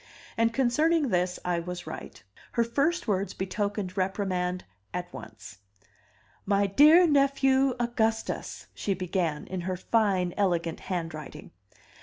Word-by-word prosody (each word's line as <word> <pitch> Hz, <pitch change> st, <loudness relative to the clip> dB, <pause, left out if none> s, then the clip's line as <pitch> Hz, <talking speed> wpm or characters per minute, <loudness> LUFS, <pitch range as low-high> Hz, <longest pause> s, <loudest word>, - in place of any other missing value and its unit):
And 230 Hz, 0 st, +2 dB
concerning 280 Hz, +5 st, +2 dB
this 180 Hz, -2 st, 0 dB
I 175 Hz, -1 st, +1 dB
was 180 Hz, +1 st, -6 dB
right; -, -, -8 dB, 0.3 s
her 235 Hz, -, +3 dB
first 285 Hz, +9 st, 0 dB
words 200 Hz, -1 st, -1 dB
betokened 195 Hz, 0 st, -3 dB
reprimand 185 Hz, -2 st, -1 dB, 0.3 s
at 180 Hz, 0 st, -5 dB
once. 110 Hz, -1 st, -10 dB, 0.8 s
"My 200 Hz, 0 st, +2 dB
dear 300 Hz, -, +7 dB
nephew 275 Hz, -3 st, +3 dB
Augustus," 225 Hz, -2 st, -1 dB
she 195 Hz, -, -2 dB
began, 175 Hz, -4 st, -2 dB
in 185 Hz, -1 st, -4 dB
her 185 Hz, +1 st, -3 dB
fine, 190 Hz, -4 st, +1 dB
elegant 170 Hz, -5 st, 0 dB
handwriting. 165 Hz, -5 st, -6 dB
195 Hz, 120 wpm, -28 LUFS, 180-240 Hz, 0.8 s, dear